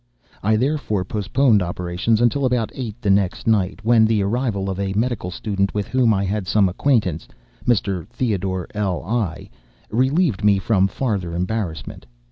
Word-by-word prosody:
I 110 +2 +2
therefore 115 -6 0
postponed 105 +3 +2
operations 90 +5 -1
until 120 +4 +2
about 125 -3 +1
eight 120 -4 -6
the 100 - +3
next 95 -2 +1
night, 105 -3 +1
when 115 -1 +5
the 110 -2 +2
arrival 105 -2 -1
of 95 0 -3
a 100 -1 -1
medical 110 -3 -1
student 100 +1 -2
with 105 -2 -1
whom 130 -3 +3
I 100 -2 +1
had 100 0 -2
some 100 0 +3
acquaintance, 95 - 0 0.4
(Mr. 100 -7 0
Theodore 95 -6 -2
L—l,) 100 -1 -1 0.6
relieved 130 - +1
me 105 -1 +5
from 95 -1 +2
farther 95 -6 -2
embarrassment. 90 - -4
105 Hz, 150 wpm, -21 LUFS, 95-115 Hz, 0.6 s, when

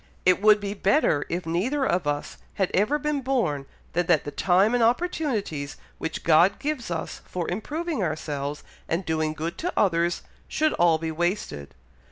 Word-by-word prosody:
It 185 +1 +4
would 210 0 +6
be 200 -1 -3
better 195 - +2
if 175 +2 -2
neither 235 - 0
of 175 - 0
us 145 0 -3 0.2
had 190 -2 0
ever 215 +10 +2
been 300 -1 -1
born, 185 - 0 0.3
than 175 0 0
that 170 -5 +4
the 145 - -5
time 195 +8 +3
and 245 - +2
opportunities 230 - 0 0.2
which 160 - -4
God 170 +4 +5
gives 290 -7 -3
us 165 -2 -4
for 175 -2 -4
improving 305 - -3
ourselves 150 -3 -3 0.3
and 170 +3 -1
doing 155 -1 0
good 165 +2 -4
to 360 +2 -1
others, 170 -3 +2 0.2
should 310 0 +1
all 170 -2 +4
be 160 0 -3
wasted. 175 - -2
180 Hz, 170 wpm, -25 LUFS, 160-240 Hz, 0.3 s, would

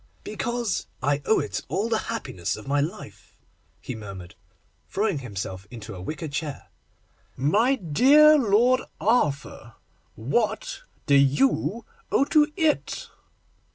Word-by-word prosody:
'Because 235 -2 -2 0.2
I 145 +1 +1
owe 220 - +4
to - - -3
it - - -4
all 210 - -1
the 225 -2 +1
happiness 95 - -3
of 110 - -11
my 145 +1 +1
life,' 155 +4 -7 0.4
he - - -6
murmured, 100 -4 -9 0.6
throwing 200 -6 0
himself 100 -5 -6
into 115 -3 -9
a 90 - -8
wicker 155 - -5
chair. 145 0 -5 0.7
'My 210 - +3
dear 270 - +6
Lord 250 0 +3 0.2
Arthur, 175 - 0 0.4
what 240 - -2 0.2
do 145 - +2
you 145 - +2 0.3
owe 275 - +3
to 300 0 +3
it? 320 -4 0
175 Hz, 125 wpm, -25 LUFS, -, 0.7 s, dear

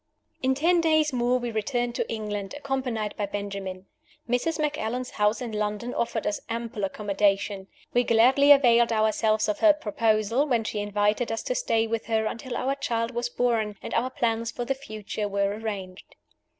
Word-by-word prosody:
In 265 0 +2
ten 340 +5 +3
days 315 -3 +3
more 245 0 +2
we 240 -1 -3
returned 240 +2 -1
to - - -2
England, 210 -1 -4
accompanied 260 -7 -2
by 205 - -1
Benjamin. 195 -2 -5 0.4
Mrs. 250 +7 0
Macallan's 255 -5 -2
house 210 +3 +1
in 235 - -5
London 210 +3 -2
offered 230 -1 -2
us 205 - -1
ample 230 -2 -4
accommodation. 200 0 0 0.3
We 245 - +4
gladly 255 +5 +5
availed 240 -4 +6
ourselves 215 0 +2
of 210 - -1
her 320 -2 +7
proposal, 225 0 +1
when 240 -5 +1
she 215 -1 -3
invited 205 +3 0
us 225 - -3
to - - -1
stay 230 - +1
with 225 0 -3
her 220 -1 +1
until 240 +3 -4
our 270 +1 0
child 230 -4 -2
was 240 0 -2
born, 230 -4 0
and - - -5
our 250 +2 +1
plans 230 -2 -1
for 245 - -4
the 270 - 0
future 215 -5 -5
were 200 0 0
arranged. 200 -4 -6
230 Hz, 175 wpm, -26 LUFS, 210-250 Hz, 0.4 s, her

